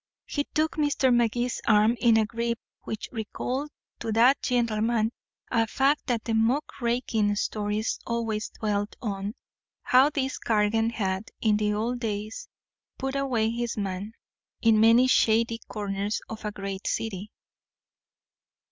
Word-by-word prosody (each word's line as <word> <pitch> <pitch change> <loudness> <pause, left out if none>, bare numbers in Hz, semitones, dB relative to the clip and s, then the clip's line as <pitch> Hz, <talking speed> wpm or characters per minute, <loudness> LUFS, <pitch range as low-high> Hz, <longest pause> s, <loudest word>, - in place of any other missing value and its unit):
He 290 -1 -2
took 315 +1 -1
Mr. 290 -4 +2
Magee's 240 +1 +1
arm 215 +1 +5
in 230 -2 +5
a 220 - +3
grip 235 +1 -2 0.3
which 220 - -4
recalled 255 +5 -3 0.3
to 225 - -3
that 245 +5 +5
gentleman 230 -2 +1 0.4
a 230 -2 +2
fact 275 +5 +1
the 235 -2 -1
muckraking 235 -3 +1
stories 210 +1 -1
always 225 -2 -2
dwelt 205 -1 -2
on 200 -1 -4 0.5
how 260 +3 +5
this 270 -3 -2
Cargan 225 +1 +2
had, 195 -3 -2
in 215 -2 +3
the 210 0 0
old 235 +3 -1
days, 220 - -4 0.5
"put 270 0 -3
away 245 -5 +1
his 235 0 -3
man" 200 +1 -3 0.5
in 225 -2 +4
many 230 +3 +6
shady 230 -2 +3
corners 205 0 -2
of 220 -1 -8
a 210 - -1
great 195 -1 -5
city. 210 -2 -3
225 Hz, 130 wpm, -27 LUFS, 210-245 Hz, 0.5 s, many